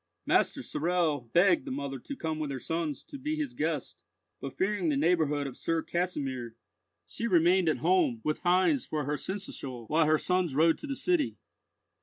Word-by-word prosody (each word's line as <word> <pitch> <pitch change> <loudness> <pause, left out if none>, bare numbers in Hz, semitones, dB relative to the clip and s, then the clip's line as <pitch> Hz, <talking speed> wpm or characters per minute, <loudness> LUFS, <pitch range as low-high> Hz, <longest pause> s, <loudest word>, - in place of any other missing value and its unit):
Master - - +2
Sorel 155 -6 0
begged 175 -1 +4
the - - -5
mother 135 0 -4
to 280 - -7
come 160 -8 -3
with 150 -2 -2
her 135 - -3
sons 160 +1 -3
to 280 - -10
be 300 +3 -2
his 295 -5 -3
guest; 155 - -3 0.4
but 135 - -7
fearing 190 -3 +1
the 145 - +1
neighbourhood 150 -2 +2
of 135 -3 -6
Sir 165 -1 -1
Kasimir, 135 -10 -3 0.5
she 235 - -4
remained 175 -2 +4
at 155 - +1
home, 325 -11 +3
with 155 - -1
Heinz 185 - +3
for 150 -1 -3
her 145 +2 -1
seneschal 135 - -5
while 155 +1 +3
her 155 0 +4
sons 180 -4 0
rode 160 +2 +4
to 300 - -6
the 275 - -3
city. 345 -1 0
165 Hz, 185 wpm, -29 LUFS, 145-190 Hz, 0.5 s, begged